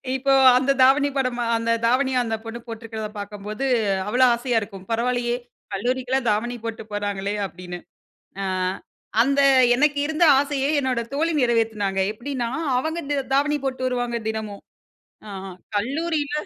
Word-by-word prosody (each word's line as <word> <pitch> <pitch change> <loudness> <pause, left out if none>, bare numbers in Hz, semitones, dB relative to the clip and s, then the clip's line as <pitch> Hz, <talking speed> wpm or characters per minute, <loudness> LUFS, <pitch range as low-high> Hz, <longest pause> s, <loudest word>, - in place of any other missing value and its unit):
இப்போ 275 +1 0 0.3
அந்த 265 +2 +2
தாவணி 275 +2 +5
படமா 250 -2 0
அந்த 230 0 -1
தாவணிய 260 +2 +2
அந்த 225 -1 -2
பொண்ணு 225 +1 -6
போட்டிருக்கிறத 225 -1 -6
பாக்கும்போது, 205 +4 -5 0.4
அவ்வளோ 245 +5 +3
ஆசையா 240 0 0
இருக்கும். 195 -2 -9
"பரவால்லையே, 240 +1 0 0.4
கல்லூரிக்குல்லாம் 250 +4 -1
தாவணி 235 +4 -1
போட்டு 225 -1 -5
போறாங்களே!" 205 -1 -2
அப்டின்னு. 180 -2 -8 0.6
அ - - -2 0.8
அந்த 275 +3 +3 0.3
எனக்கு 290 +2 +2
இருந்த 315 +2 +1 0.2
ஆசையை 280 -1 0
என்னோட 260 -3 0
தோழி 320 +4 +1
நிறைவேத்துனாங்க. 220 -5 +1
எப்டின்னா, 245 +1 -4 0.3
அவங்க 315 +6 -2
த 285 -1 +1
தாவணி 295 +2 +2
போட்டு 260 -1 -2
வருவாங்க, 245 -1 -1
தினமும். 215 -2 -5 0.7
ஆஹ 195 0 -7 0.3
கல்லூரில 290 +6 -1
240 Hz, 130 wpm, -23 LUFS, 220-270 Hz, 0.8 s, தாவணி